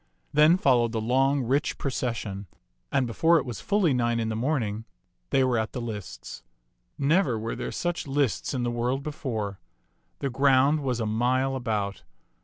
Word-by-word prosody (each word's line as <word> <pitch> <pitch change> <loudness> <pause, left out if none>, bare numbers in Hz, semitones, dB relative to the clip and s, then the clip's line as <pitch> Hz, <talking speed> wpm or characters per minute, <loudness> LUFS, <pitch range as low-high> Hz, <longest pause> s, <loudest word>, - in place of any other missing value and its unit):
Then 155 +4 +6
followed 120 -8 +3
the 115 - 0
long, 135 +4 +2
rich 135 +5 0
pro 140 - -2
cession; 110 -6 -3 0.4
and 135 -2 +2
before 165 +8 +3
it - - -1
was 120 -4 -6
fully 200 -7 +2
nine 120 -1 +1
in 110 -1 -1
the 110 - -2
morning, 115 -4 -1 0.4
they 135 - +3
were 125 -3 +2
at 110 0 -3
the - - -3
lists. 105 - -7 0.6
Never 145 - +2
were 115 +1 -4
there - - -4
such 175 -3 -3
lists 140 -1 0
in 125 - -1
the 120 - 0
world 125 +3 -1
before. 110 -10 -4 0.6
The 140 - -3
ground 135 +3 +4
was 130 -4 -2
a 115 - -1
mile 125 +5 +1
about. 105 -6 -2
125 Hz, 175 wpm, -26 LUFS, 115-140 Hz, 0.6 s, Then